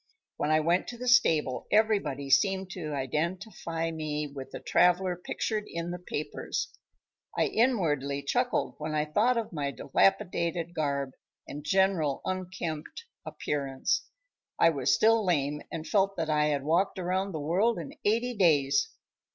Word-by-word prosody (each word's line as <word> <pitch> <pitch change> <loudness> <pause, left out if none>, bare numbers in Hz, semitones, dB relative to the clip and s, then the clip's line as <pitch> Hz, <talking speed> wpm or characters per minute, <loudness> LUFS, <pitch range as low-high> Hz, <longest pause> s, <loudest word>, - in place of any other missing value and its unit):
When - - -1
I 155 0 +4
went 170 +4 +1
to 240 - -7
the 250 +1 -6
stable 155 - +3
everybody 200 -11 +1
seemed 190 +6 +3
to 165 -5 -5
identify 165 - -2
me 150 -2 -3
with 140 -2 -8
the - - -7
traveler 180 +1 +3
pictured 210 +4 -3
in 170 +1 -4
the 180 - -5
papers. 155 -4 -4 0.6
I - - +3
inwardly 150 - +1
chuckled 245 - 0
when 155 0 -3
I 150 0 +1
thought 220 +11 +2
of 225 -5 -3
my 145 -3 -2
dilapidated 165 - 0
garb 140 -4 -1 0.4
and 145 +1 -7
general 165 -4 +2
unkempt 185 - -4 0.2
appearance. 135 -2 -2 0.5
I 165 - +5
was 140 -5 0
still 225 0 +4
lame 150 -5 0
and 160 -1 -5
felt 195 0 +2
that 160 -2 -1
I 150 0 +3
had 145 -2 0
walked 170 +7 +1
around 185 +2 -1
the 160 - -4
world 190 +10 +1
in 165 -5 -6
eighty 235 +4 +1
days. 175 - +3
165 Hz, 150 wpm, -29 LUFS, 150-195 Hz, 0.6 s, I